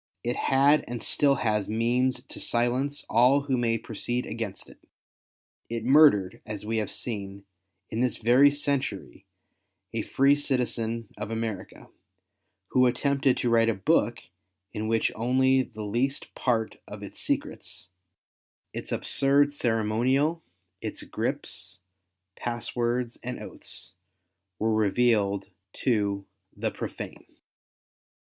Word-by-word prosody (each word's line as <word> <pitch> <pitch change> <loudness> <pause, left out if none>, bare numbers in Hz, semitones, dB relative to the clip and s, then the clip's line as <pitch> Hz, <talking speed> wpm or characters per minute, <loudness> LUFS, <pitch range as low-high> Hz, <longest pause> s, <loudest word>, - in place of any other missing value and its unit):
It 120 +1 -1
had 140 +3 +4
and 120 0 -4
still 140 -1 +3
has 105 -5 0
means 125 +3 +1
to 135 - -10
silence 125 +5 0
all 125 +5 +5
who 140 -2 0
may 115 -2 +1
proceed 120 +2 -3
against 110 -4 -5
it. - - -16 0.9
It 115 -1 -3
murdered, 130 -9 +5
as 105 -1 -7
we 110 +1 -1
have 110 - -1
seen, 100 -4 -6 0.5
in 115 - -1
this 125 -2 +1
very 125 +5 +6
century, 140 - -3 0.7
a - - 0
free 140 +1 +3
citizen 115 -5 -1
of 105 0 -5
America, 110 -4 -5 0.8
who 130 0 +4
attempted 135 +1 +2
to 120 - 0
write 115 0 +4
a 115 - +1
book 95 - +1 0.5
in 110 -1 -3
which 115 0 +2
only 130 +3 +3
the 110 -4 -7
least 125 +7 -1
part 115 -3 0
of - - -8
its - - -8
secrets - - -3 0.4
— - - -62
its - - -5
absurd 140 +1 +2
ceremonial, 125 +6 +1 0.4
its - - -5
grips, 90 +2 -5 0.6
pass 120 0 -4
words 120 0 -1
and 125 +1 -5
oaths, - - -7 0.6
were 110 0 +1
revealed 105 -2 +2 0.2
to 100 -5 0 0.3
•■' - - -18
the - - 0
profane." - - -7
120 Hz, 130 wpm, -27 LUFS, 110-130 Hz, 0.9 s, very